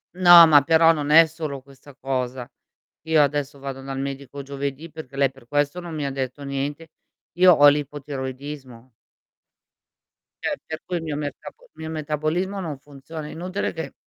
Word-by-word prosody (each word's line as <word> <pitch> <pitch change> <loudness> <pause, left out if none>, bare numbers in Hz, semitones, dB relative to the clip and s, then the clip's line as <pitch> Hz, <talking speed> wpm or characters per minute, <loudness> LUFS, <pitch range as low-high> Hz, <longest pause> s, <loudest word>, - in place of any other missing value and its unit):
No, 175 -2 +9
ma 150 -2 +7
però 165 +2 +5
non 150 -2 -2
è 165 +1 +8
solo 155 -4 -6
questa 140 +1 -17
cosa. 130 -2 -4 0.6
Io 160 -1 +4
adesso 145 -1 -1
vado 135 -1 -7
dal 135 0 -6
medico 140 0 -6
giovedì, 140 +3 -5
perché 155 -4 -10
lei 140 -1 +2
per 135 -3 -20
questo 145 +4 0
non 175 -2 -8
mi 150 -2 -3
ha 140 - -2
detto 135 +1 -5
niente. 140 +3 -4 0.5
Io 180 +1 +6
ho 145 -2 +6
l'ipotiroidismo. 135 -3 -3 1.5
Cioè, - - -2
per 160 0 -7
cui 180 - -2
il 165 - -5
mio 155 -2 -4
mercabo 150 - -8
mio 160 - -8
metabolismo 155 +5 -2
non 160 -6 -5
funziona, 145 +2 -10
è - - -9
inutile 185 +4 -4
che 160 -1 -6
145 Hz, 165 wpm, -23 LUFS, 135-160 Hz, 1.5 s, No